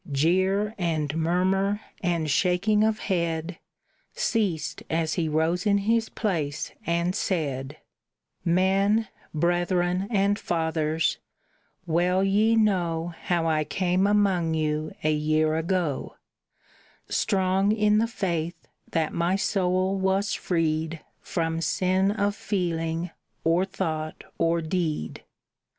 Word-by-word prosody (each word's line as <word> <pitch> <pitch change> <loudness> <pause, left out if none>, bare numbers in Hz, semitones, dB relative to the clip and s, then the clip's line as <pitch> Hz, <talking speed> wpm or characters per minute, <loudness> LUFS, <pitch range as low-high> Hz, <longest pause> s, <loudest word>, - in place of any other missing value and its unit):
Jeer 190 +8 +2
and 155 -4 -1
murmur 190 +5 +1 0.2
and 170 -4 0
shaking 185 +7 +2
of 220 0 +2
head 170 -3 -2 0.6
Ceased 200 -9 -1
as 160 -1 0
he 160 -1 0
rose 165 +5 +1
in 200 0 +4
his 225 +3 +1
place 160 -9 -2 0.2
and 170 +1 +1
said: 145 -8 -2 0.7
"Men, 195 +5 +2 0.2
brethren, 175 +3 +1
and 205 -2 +2
fathers, 160 -1 0 0.7
well 180 +3 +2
ye 210 +4 +3
know 175 -6 +1
How 170 -2 +1
I 155 -1 +2
came 185 +4 +1
among 190 -6 +2
you 155 0 -1
a 155 - +3
year 155 +1 +1
ago, 165 -3 -1 0.9
Strong 190 +1 +1
in 210 -1 +3
the 230 - +2
faith 175 -6 -2 0.3
that 160 -2 0
my 170 +2 +1
soul 190 -1 +1
was 190 +1 +1
freed 160 -2 -1 0.2
From 165 -1 -2
sin 185 +4 +1
of 205 -1 0
feeling, 170 -4 -2 0.3
or 170 +3 +3
thought, 160 -5 -4 0.2
or 165 0 +2
deed. 155 - -2
175 Hz, 110 wpm, -26 LUFS, 160-195 Hz, 0.9 s, in